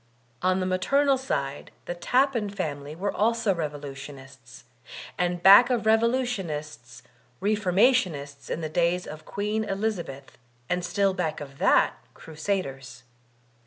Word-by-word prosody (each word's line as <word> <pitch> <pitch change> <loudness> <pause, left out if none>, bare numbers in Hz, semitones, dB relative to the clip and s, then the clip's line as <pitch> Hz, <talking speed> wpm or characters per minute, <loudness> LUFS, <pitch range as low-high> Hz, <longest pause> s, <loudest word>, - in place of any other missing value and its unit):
On 185 +1 +2
the 185 - -1
maternal 275 +10 +2
side 140 - -3 0.2
the - - -3
Tappan 245 +4 +1
family 150 -7 -5
were 200 +4 -2
also 230 -1 +1
revolutionists, 140 -5 -8 0.5
and 175 -1 -1
back 200 +6 +9
of 240 -4 0
revolutionists 190 - -1 0.4
Reformationists 190 - +1
in 165 - -3
the 160 - -2
days 170 +3 0
of 155 0 -9
Queen 210 +2 -2
Elizabeth, 195 -10 -4 0.3
and 180 +3 -1
still 195 +2 +1
back 160 -4 -2
of 140 -1 -10
that, - - +3 0.2
Crusaders. 140 -7 -4
180 Hz, 120 wpm, -26 LUFS, 145-210 Hz, 0.5 s, back